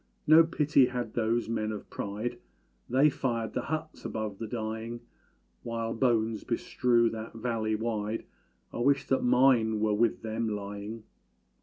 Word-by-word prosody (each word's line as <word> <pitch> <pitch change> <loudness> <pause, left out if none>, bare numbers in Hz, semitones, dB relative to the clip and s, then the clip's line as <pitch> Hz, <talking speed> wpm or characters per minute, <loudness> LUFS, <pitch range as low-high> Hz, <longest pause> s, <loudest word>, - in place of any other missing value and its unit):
No 160 +2 +8
pity 150 -5 +3
had 125 -3 -4
those 115 0 0
men 110 -1 -1
of 105 - -7
pride, 105 +4 -4 0.5
They 135 +5 +5
fired 115 -5 -2
the - - -1
huts 155 0 -5
above 110 -3 -4
the 115 - -4
dying! 110 +1 -4 0.6
While 115 -1 -3
bones 115 -3 +1
bestrew 120 -2 +2
that 110 0 -7
valley 115 -2 -1
wide 110 -1 -2 0.5
I - - -5
wish 140 +3 +2
that 135 - +2
mine 120 -4 +4
were 105 0 +2
with 115 +2 +1
them 110 0 -2
lying! 105 +2 -5
115 Hz, 145 wpm, -29 LUFS, 110-125 Hz, 0.6 s, No